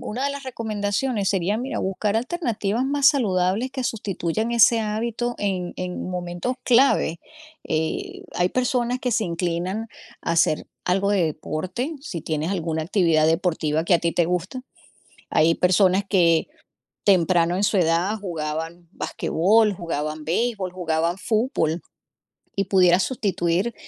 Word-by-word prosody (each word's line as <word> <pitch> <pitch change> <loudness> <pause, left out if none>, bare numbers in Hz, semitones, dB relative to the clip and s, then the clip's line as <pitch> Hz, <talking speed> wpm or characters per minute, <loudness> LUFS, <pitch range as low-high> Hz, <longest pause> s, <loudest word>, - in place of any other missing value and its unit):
una 250 +6 -3
de 280 - 0
las 280 0 -7
recomendaciones 215 -2 -2
sería, 195 +2 0
mira, 255 +3 -3
buscar 195 +3 -1
alternativas 235 - -1
más 280 0 +2
saludables 205 -2 +1
que 260 -1 -4
sustituyan 215 -2 -2
ese 235 0 +5
hábito 230 +3 -2
en 185 -3 -2
en 180 0 -4
momentos 180 +7 -3
clave. 240 -9 +3 0.4
Eh, 160 0 -3
hay 180 0 +2
personas 250 +1 0
que 250 -1 -1
se 220 - +1
inclinan 175 +5 -2 0.4
a - - -1
hacer 165 -2 +2 0.2
algo 195 +2 +1
de 190 -4 +3
deporte, 180 - -4
si 200 - -6
tienes 155 +2 -2
alguna 165 -4 -2
actividad 165 -3 +2
deportiva 160 -2 0
que 175 - +3
a - - +5
ti 170 - +1
te 175 - +2
gusta. 180 +9 -3 0.7
Hay 160 +2 +4
personas 185 +2 +3
que 170 - +3 0.6
temprano 175 -3 +3
en 195 - -1
su 205 - +2
edad 175 +4 +2
jugaban 165 -1 -5
basquetbol, 210 +7 +2
jugaban 155 -3 -4
béisbol, 195 +2 -1
jugaban 170 -1 -1
fútbol, 190 - 0 0.8
y 195 - 0
pudieras 185 -1 +4
sustituir 195 -3 -1
185 Hz, 140 wpm, -23 LUFS, 170-225 Hz, 0.8 s, ese